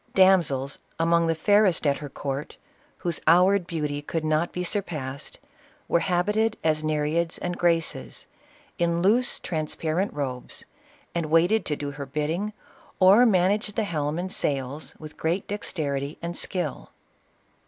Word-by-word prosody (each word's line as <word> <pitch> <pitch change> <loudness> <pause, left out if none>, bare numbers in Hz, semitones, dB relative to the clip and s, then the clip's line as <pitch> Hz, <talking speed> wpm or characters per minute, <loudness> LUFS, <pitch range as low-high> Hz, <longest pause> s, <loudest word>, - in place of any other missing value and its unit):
Damsels, 170 -8 +4 0.2
among 170 0 +3
the 165 - +1
fairest 205 0 +3
at 140 -1 +3
her 145 - -7
court, 140 +1 -5 0.4
whose 170 -2 -1
houried 180 +2 +5
beauty 150 -3 -2
could 155 +2 -3
not 155 +2 +1
be 180 - -3
surpassed, 150 -8 -4 0.5
were 170 - +3
habited 210 +5 +1
as 155 -1 +1
Ne 155 0 0
reids 165 +3 0
and 175 0 -3
Graces, 170 -2 0 0.5
in 170 0 +1
loose, 235 +6 +3
transparent 160 +3 -2
robes, 130 -4 -5 0.5
and 170 -2 -1
wait 165 +4 +4
ed 220 0 +2
to 150 - -1
do 145 -1 -4
her 140 -1 -7
bidding, 155 +9 -2 0.5
or 200 +7 +7
managed 205 +1 +2
the 225 - +1
helm 155 -5 -2
and 185 +2 -3
sails 140 0 -2
with 155 -1 -11
great 170 +4 -1
dexterity 145 -8 -3
and 170 +1 -5
skill. 180 0 -2
165 Hz, 145 wpm, -26 LUFS, 150-185 Hz, 0.5 s, or